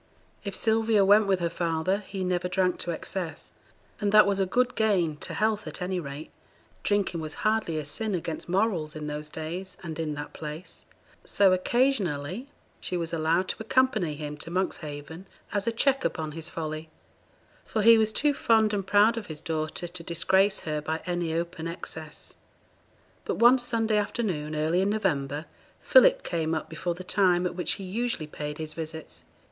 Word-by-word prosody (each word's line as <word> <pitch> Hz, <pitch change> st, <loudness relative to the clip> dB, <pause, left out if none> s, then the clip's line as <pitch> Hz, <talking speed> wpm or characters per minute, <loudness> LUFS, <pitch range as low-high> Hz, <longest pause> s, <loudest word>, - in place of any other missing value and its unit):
If 200 Hz, -2 st, -4 dB
Sylvia 220 Hz, -2 st, +3 dB
went 205 Hz, +1 st, +6 dB
with 190 Hz, -2 st, +2 dB
her 170 Hz, -, +1 dB
father, 170 Hz, +3 st, 0 dB
he 195 Hz, -2 st, -5 dB
never 180 Hz, 0 st, 0 dB
drank 180 Hz, 0 st, +1 dB
to -, -, -3 dB
excess; 170 Hz, -1 st, -5 dB, 0.5 s
and 205 Hz, -1 st, +1 dB
that 215 Hz, 0 st, +8 dB
was 200 Hz, -1 st, +1 dB
a 190 Hz, -, +2 dB
good 245 Hz, +5 st, +2 dB
gain 190 Hz, -8 st, +2 dB
to -, -, -5 dB
health 215 Hz, -1 st, 0 dB
at -, -, -6 dB
any 180 Hz, 0 st, -1 dB
rate 145 Hz, -1 st, -7 dB, 0.5 s
(drinking 200 Hz, -5 st, 0 dB
was 155 Hz, -1 st, -5 dB
hardly 215 Hz, -7 st, +1 dB
a 155 Hz, -, -3 dB
sin 210 Hz, +7 st, -2 dB
against 165 Hz, -1 st, -4 dB
morals 180 Hz, -5 st, 0 dB
in 155 Hz, -1 st, -5 dB
those 150 Hz, 0 st, -4 dB
days, 170 Hz, +5 st, -6 dB
and 160 Hz, -2 st, -6 dB
in 155 Hz, -2 st, -2 dB
that 145 Hz, 0 st, -7 dB
place); 155 Hz, +3 st, -8 dB, 0.4 s
so, 195 Hz, -2 st, +4 dB
occasionally, 195 Hz, -, 0 dB, 0.3 s
she 180 Hz, -, -2 dB
was 170 Hz, -1 st, -3 dB
allowed 165 Hz, +3 st, +1 dB
to -, -, 0 dB
accompany 220 Hz, -, +2 dB
him 150 Hz, 0 st, -6 dB
to 155 Hz, -, -8 dB
Monkshaven 160 Hz, -1 st, -4 dB, 0.3 s
as 205 Hz, +2 st, -1 dB
a -, -, +3 dB
check 270 Hz, +4 st, +2 dB
upon 155 Hz, -2 st, -2 dB
his 165 Hz, +2 st, -6 dB
folly; 155 Hz, -2 st, -5 dB, 0.7 s
for 215 Hz, -, -1 dB
he 230 Hz, +1 st, +8 dB
was 220 Hz, 0 st, +2 dB
too 290 Hz, +6 st, +2 dB
fond 220 Hz, -5 st, +3 dB
and 195 Hz, -2 st, -2 dB
proud 210 Hz, +4 st, +5 dB
of 225 Hz, -, -5 dB
his 155 Hz, -2 st, -4 dB
daughter 160 Hz, +1 st, -3 dB
to 175 Hz, 0 st, -7 dB
disgrace 190 Hz, +5 st, +2 dB
her 150 Hz, -1 st, -2 dB
by 160 Hz, +2 st, -2 dB
any 175 Hz, -2 st, -1 dB
open 165 Hz, 0 st, -3 dB
excess. 160 Hz, -2 st, -8 dB, 0.9 s
But -, -, -2 dB
one 245 Hz, +2 st, +6 dB
Sunday 225 Hz, -3 st, +1 dB
afternoon 190 Hz, -8 st, -1 dB
early 160 Hz, +4 st, +2 dB
in 195 Hz, -, +2 dB
November, 150 Hz, -8 st, -1 dB, 0.3 s
Philip -, -, +6 dB
came 165 Hz, -2 st, -1 dB
up 155 Hz, -, -4 dB
before 175 Hz, -2 st, -2 dB
the 185 Hz, -, -8 dB
time 180 Hz, -1 st, +3 dB
at 180 Hz, -, -1 dB
which 180 Hz, 0 st, 0 dB
he 195 Hz, -, -7 dB
usually 225 Hz, -1 st, -2 dB
paid 150 Hz, 0 st, -6 dB
his 155 Hz, -1 st, -5 dB
visits. 160 Hz, 0 st, -7 dB
180 Hz, 180 wpm, -27 LUFS, 160-210 Hz, 0.9 s, that